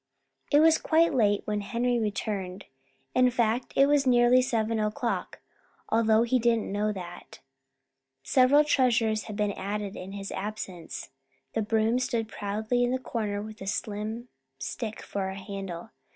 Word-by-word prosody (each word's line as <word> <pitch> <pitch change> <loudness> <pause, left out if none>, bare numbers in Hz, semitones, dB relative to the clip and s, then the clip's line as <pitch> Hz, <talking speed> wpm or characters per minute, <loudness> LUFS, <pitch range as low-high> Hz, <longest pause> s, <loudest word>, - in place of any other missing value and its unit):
It 290 0 +6
was 320 0 +5
quite 330 0 +3
late 205 -5 +2
when 210 -1 -1
Henry 240 +3 0
returned. 200 -3 -3 0.5
In 255 0 +5
fact, 235 0 0
it 275 - +6
was 285 -1 +3
nearly 245 0 +5
seven 225 -3 0
o'clock, 215 +4 -2 0.5
although 225 0 +4
he 250 +2 +2
didn't 230 -3 +1
know 210 +1 0
that. 175 -3 -9 0.8
Several 260 - +5
treasures 230 -7 +2
had 215 - -6
been 210 -1 0
added 200 +1 -4
in 190 +2 -8
his 200 0 -6
absence. 190 -5 -6 0.4
The 225 - 0
broom 220 +2 +1
stood 235 -3 -1
proudly 220 +4 -1
in 245 - +2
the 255 - +1
corner 210 -5 -3
with 215 0 -10
a 195 - -6
slim 215 +4 -3 0.3
stick 220 - -5
for 195 -1 -3
a 190 - -6
handle. 195 -3 -7
220 Hz, 150 wpm, -28 LUFS, 205-245 Hz, 0.8 s, It